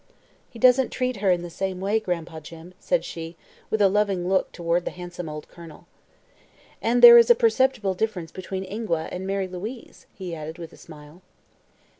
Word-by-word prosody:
"He -, -, -13 dB
doesn't 255 Hz, +2 st, +4 dB
treat 255 Hz, -2 st, -2 dB
her 195 Hz, -1 st, 0 dB
in 175 Hz, -1 st, +2 dB
the 175 Hz, -, -8 dB
same 190 Hz, +1 st, -4 dB
way, 200 Hz, +4 st, 0 dB
Gran'pa 170 Hz, -5 st, -4 dB
Jim," 165 Hz, +3 st, -12 dB
said -, -, 0 dB
she, 165 Hz, 0 st, -7 dB, 0.3 s
with 220 Hz, -1 st, +1 dB
a -, -, +7 dB
loving 195 Hz, -3 st, 0 dB
look 190 Hz, 0 st, +1 dB
toward 170 Hz, 0 st, -1 dB
the -, -, -3 dB
handsome 175 Hz, -2 st, -8 dB
old 150 Hz, 0 st, -8 dB
Colonel. 170 Hz, -3 st, -14 dB, 1.0 s
"And 240 Hz, +2 st, +1 dB
there 235 Hz, 0 st, +12 dB
is 230 Hz, -, +4 dB
a 240 Hz, -, +8 dB
perceptible 225 Hz, -3 st, +1 dB
difference 185 Hz, -5 st, -3 dB
between 190 Hz, 0 st, -6 dB
Ingua 190 Hz, -5 st, -3 dB
and 185 Hz, +1 st, -5 dB
Mary 195 Hz, -1 st, -1 dB
Louise," 210 Hz, +7 st, -9 dB
he 185 Hz, -4 st, -7 dB
added 160 Hz, +1 st, -7 dB
with 170 Hz, -2 st, -9 dB
a -, -, -15 dB
smile. 155 Hz, +2 st, -14 dB
185 Hz, 185 wpm, -24 LUFS, 170-220 Hz, 1.0 s, there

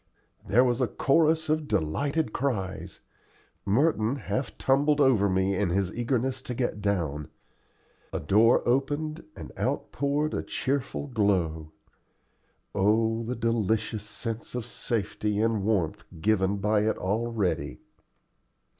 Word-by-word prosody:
There 120 Hz, +6 st, +5 dB
was 125 Hz, 0 st, +1 dB
a 125 Hz, -, +3 dB
chorus 160 Hz, +5 st, +2 dB
of 155 Hz, 0 st, 0 dB
delighted 140 Hz, -, 0 dB
cries. 105 Hz, -8 st, -3 dB, 0.6 s
Merton 115 Hz, +2 st, +2 dB
half 135 Hz, -1 st, -3 dB
tumbled 145 Hz, +2 st, +2 dB
over 120 Hz, -8 st, +4 dB
me 95 Hz, +1 st, +1 dB
in 100 Hz, -1 st, +1 dB
his 95 Hz, +1 st, 0 dB
eagerness 130 Hz, +2 st, -1 dB
to 125 Hz, -, -5 dB
get 120 Hz, -4 st, -2 dB
down. 80 Hz, -8 st, -1 dB, 0.8 s
A -, -, -2 dB
door 110 Hz, +4 st, +4 dB
opened, 145 Hz, +5 st, 0 dB
and -, -, -9 dB
out -, -, -2 dB
poured 145 Hz, +3 st, 0 dB
a -, -, -1 dB
cheerful 140 Hz, +1 st, -2 dB
glow. 95 Hz, -, 0 dB, 1.0 s
Oh 110 Hz, +3 st, +2 dB
the 120 Hz, +2 st, -3 dB
delicious 110 Hz, -2 st, 0 dB
sense 115 Hz, +2 st, -5 dB
of 125 Hz, -3 st, -3 dB
safety 105 Hz, -3 st, -2 dB
and 110 Hz, -2 st, +1 dB
warmth 95 Hz, -7 st, 0 dB, 0.2 s
given 100 Hz, +1 st, +2 dB
by 105 Hz, +2 st, +2 dB
it -, -, -1 dB
already! 110 Hz, 0 st, -1 dB
115 Hz, 125 wpm, -27 LUFS, 100-135 Hz, 1.0 s, There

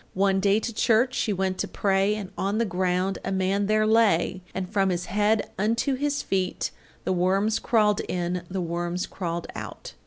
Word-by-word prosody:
One 195 Hz, 0 st, +2 dB
day 200 Hz, +2 st, +3 dB
to 230 Hz, +1 st, -4 dB
church 235 Hz, +3 st, +3 dB
she 220 Hz, -, 0 dB
went 190 Hz, -1 st, -1 dB
to -, -, -1 dB
pray, 195 Hz, +1 st, +1 dB
And 200 Hz, -3 st, -6 dB
on 200 Hz, +2 st, -1 dB
the 230 Hz, -, +2 dB
ground 185 Hz, 0 st, 0 dB
a 195 Hz, -, -3 dB
man 195 Hz, +1 st, +1 dB
there 215 Hz, 0 st, +3 dB
lay, 205 Hz, -5 st, +3 dB
And 190 Hz, -1 st, -4 dB
from 195 Hz, -1 st, +1 dB
his 180 Hz, -1 st, -1 dB
head 210 Hz, +2 st, +1 dB
unto 230 Hz, +6 st, +1 dB
his 285 Hz, +2 st, -1 dB
feet 190 Hz, -1 st, -1 dB, 0.3 s
The -, -, 0 dB
worms 195 Hz, +4 st, +2 dB
crawled 210 Hz, -3 st, +2 dB
in, 180 Hz, 0 st, -1 dB
the 190 Hz, 0 st, -2 dB
worms 175 Hz, +1 st, -2 dB
crawled 170 Hz, -2 st, -4 dB
out. -, -, -8 dB
195 Hz, 185 wpm, -26 LUFS, 185-215 Hz, 0.3 s, day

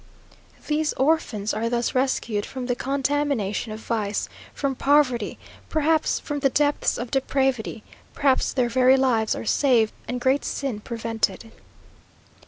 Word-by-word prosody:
These 305 Hz, 0 st, 0 dB
orphans 265 Hz, -8 st, 0 dB
are 230 Hz, +1 st, -1 dB
thus 240 Hz, 0 st, -1 dB
rescued 245 Hz, -5 st, 0 dB
from 255 Hz, +2 st, -6 dB
the 245 Hz, -, 0 dB
contamination 270 Hz, -6 st, -1 dB
of 215 Hz, -, -6 dB
vice, 210 Hz, -3 st, -2 dB, 0.2 s
from 275 Hz, -1 st, -2 dB
poverty, 260 Hz, -5 st, +2 dB, 0.3 s
perhaps 315 Hz, 0 st, +1 dB
from 290 Hz, -1 st, -4 dB
the 275 Hz, -1 st, +3 dB
depths 290 Hz, +2 st, +1 dB
of 240 Hz, 0 st, -5 dB
depravity; 265 Hz, -5 st, 0 dB, 0.3 s
perhaps 270 Hz, -2 st, +2 dB
their 250 Hz, -2 st, +1 dB
very 255 Hz, +2 st, +4 dB
lives 235 Hz, -5 st, +2 dB
are -, -, -6 dB
saved, 235 Hz, -4 st, +3 dB
and 245 Hz, +1 st, -3 dB
great 260 Hz, +3 st, +2 dB
sin 270 Hz, -7 st, -3 dB
prevented. 225 Hz, 0 st, -3 dB
255 Hz, 135 wpm, -24 LUFS, 230-280 Hz, 0.3 s, very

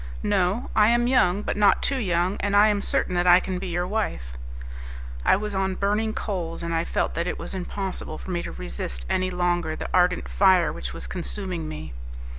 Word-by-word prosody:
"No; 200 Hz, +3 st, 0 dB
I 210 Hz, -1 st, +6 dB
am 240 Hz, +1 st, +3 dB
young, 210 Hz, -6 st, +3 dB
but -, -, -2 dB
not 205 Hz, -2 st, +4 dB
too 275 Hz, -1 st, +1 dB
young, 180 Hz, -2 st, 0 dB
and 205 Hz, 0 st, 0 dB
I 210 Hz, +1 st, +7 dB
am 205 Hz, -1 st, +1 dB
certain 185 Hz, -, +1 dB
that 175 Hz, 0 st, +1 dB
I 175 Hz, 0 st, +8 dB
can 185 Hz, -1 st, -4 dB
be 190 Hz, -, -5 dB
your 175 Hz, 0 st, -1 dB
wife." 180 Hz, -, -3 dB, 0.9 s
I -, -, +5 dB
was 210 Hz, +1 st, -3 dB
on 190 Hz, -1 st, 0 dB
burning 210 Hz, +3 st, 0 dB
coals, 175 Hz, -7 st, -4 dB
and 170 Hz, 0 st, -2 dB
I 165 Hz, +1 st, 0 dB
felt -, -, -1 dB
that 170 Hz, +1 st, -2 dB
it -, -, -2 dB
was -, -, -6 dB
impossible 190 Hz, -3 st, -4 dB
for -, -, -7 dB
me 175 Hz, -1 st, -1 dB
to -, -, -6 dB
resist -, -, -5 dB
any 185 Hz, 0 st, +1 dB
longer 175 Hz, -3 st, 0 dB
the -, -, -6 dB
ardent 180 Hz, 0 st, +2 dB
fire 185 Hz, -3 st, +4 dB
which 60 Hz, 0 st, -6 dB
was -, -, -7 dB
consuming 60 Hz, +5 st, -4 dB
me. 75 Hz, -2 st, -7 dB
180 Hz, 210 wpm, -25 LUFS, 170-205 Hz, 0.9 s, I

